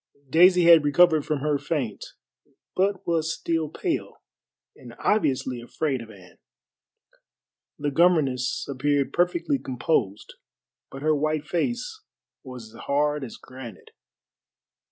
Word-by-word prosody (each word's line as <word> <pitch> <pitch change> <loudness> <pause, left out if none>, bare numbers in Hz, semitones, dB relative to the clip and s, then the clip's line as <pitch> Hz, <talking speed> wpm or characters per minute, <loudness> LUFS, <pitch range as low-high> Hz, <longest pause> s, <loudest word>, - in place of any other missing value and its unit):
Daisy 180 +2 +6
had 165 -2 +7
recovered 155 +1 +4
from 150 -3 -1
her 150 -1 0
faint, 135 -11 -3 0.7
but 195 +1 0
was 165 -1 0
still 165 -2 -2
pale 330 - -4 0.5
and - - -13
obviously 130 - 0
afraid 135 +1 -2
of 115 - -11
Anne. 90 -4 -16 1.4
The 145 0 -2
governess 140 -6 +2
appeared 140 +1 0
perfectly 170 -5 +1
composed, 125 -5 -2 0.6
but 135 +1 -9
her 155 0 +3
white 155 +1 -1
face 240 - -3 0.4
was 125 -5 -10
as - - -11
hard 145 +1 0
as 120 - -8
granite. 130 -3 -12
150 Hz, 115 wpm, -25 LUFS, 130-170 Hz, 1.4 s, had